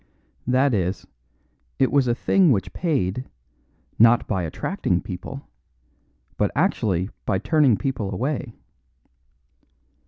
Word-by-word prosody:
That 130 +2 +3
is, 95 -2 -1 0.7
it 130 - +2
was 140 -3 +3
a 120 - +2
thing 180 +5 +3
which 100 -6 -1
paid 130 - -1 0.7
not 115 +1 +6
by 95 -4 -1
attracting 90 - -1
people, 115 +10 -8 0.9
but - - +2
actually 95 -2 0 0.2
by 95 - +2
turning 140 - +3
people 130 -8 -3
away. 125 +3 -3
120 Hz, 105 wpm, -23 LUFS, 95-140 Hz, 0.9 s, not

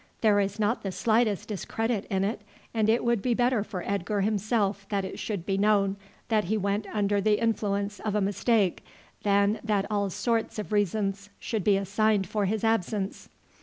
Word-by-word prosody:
There 210 -2 +4
is 200 +1 -1
not 215 +3 +1
the 195 - -3
slightest 220 0 +1
discredit 220 +2 -2
in 190 0 +1
it, 205 +3 -2 0.3
and 220 -2 +2
it 230 +2 +3
would 235 -3 +1
be 245 +1 +1
better 245 -3 +2
for 185 -4 -6
Edgar 200 +1 -1
himself 205 -1 0
that 200 -2 0
it 190 - -7
should 200 -6 -3
be 195 0 0
known 200 -1 +3 0.3
that 215 -4 +2
he 215 +5 0
went 200 +1 -1
under 205 -1 +1
the 210 +1 +2
influence 205 -3 -1
of 215 -1 -2
a - - +3
mistake 200 -1 +1 0.4
than 200 +1 +2
that 210 -3 +1
all 200 -1 +1
sorts 230 +4 -1
of 210 0 -5
reasons 205 0 0
should 220 -4 -2
be 200 0 +4
assigned 205 +1 +1
for 205 +2 -1
his 215 +3 -1
absence. 210 -2 -1
205 Hz, 185 wpm, -27 LUFS, 200-220 Hz, 0.4 s, There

